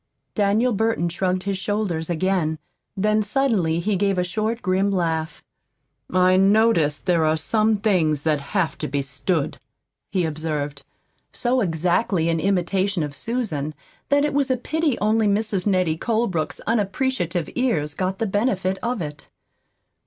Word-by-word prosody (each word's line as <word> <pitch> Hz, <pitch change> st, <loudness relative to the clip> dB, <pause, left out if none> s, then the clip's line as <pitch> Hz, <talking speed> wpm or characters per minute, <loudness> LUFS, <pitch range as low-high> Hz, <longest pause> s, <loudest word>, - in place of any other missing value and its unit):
Daniel 215 Hz, +4 st, +2 dB
Burton 220 Hz, -4 st, +1 dB
shrugged 185 Hz, +2 st, -1 dB
his 195 Hz, -1 st, -2 dB
shoulders 190 Hz, -6 st, -2 dB
again. 175 Hz, -2 st, 0 dB, 0.4 s
Then 215 Hz, +2 st, +2 dB
suddenly 210 Hz, -8 st, +1 dB
he 200 Hz, +4 st, 0 dB
gave 195 Hz, 0 st, +1 dB
a 180 Hz, -, +2 dB
short, 215 Hz, +6 st, -2 dB
grim 190 Hz, +1 st, +2 dB
laugh. 165 Hz, -4 st, -1 dB, 0.7 s
"I 185 Hz, +1 st, +4 dB
notice 195 Hz, -6 st, +4 dB
there 175 Hz, -3 st, +1 dB
are 155 Hz, 0 st, +2 dB
some 215 Hz, +6 st, +1 dB
things 170 Hz, -8 st, +1 dB
that 155 Hz, -2 st, +2 dB
have 160 Hz, +2 st, -2 dB
to -, -, -2 dB
be 140 Hz, +1 st, -1 dB
stood," 140 Hz, +3 st, -2 dB, 0.5 s
he 185 Hz, -3 st, +1 dB
observed, 150 Hz, -2 st, -3 dB, 0.5 s
so 250 Hz, +1 st, 0 dB
exactly 175 Hz, 0 st, +1 dB
in 165 Hz, -1 st, +1 dB
imitation 190 Hz, 0 st, 0 dB
of 145 Hz, -1 st, -4 dB
Susan 160 Hz, -, -3 dB, 0.3 s
that 285 Hz, +1 st, +3 dB
it 295 Hz, -, -1 dB
was 280 Hz, -1 st, +1 dB
a 260 Hz, -, +2 dB
pity 310 Hz, +1 st, -1 dB
only 215 Hz, +1 st, +2 dB
Mrs. 205 Hz, -1 st, 0 dB
Nettie 180 Hz, -5 st, +1 dB
Colebrook's 220 Hz, -8 st, -1 dB
unappreciative 205 Hz, -, -1 dB
ears 160 Hz, -, 0 dB
got 185 Hz, +4 st, -2 dB
the 225 Hz, -, -1 dB
benefit 195 Hz, -2 st, 0 dB
of 240 Hz, -5 st, -2 dB
it. 150 Hz, -2 st, -8 dB
190 Hz, 145 wpm, -23 LUFS, 160-215 Hz, 0.7 s, I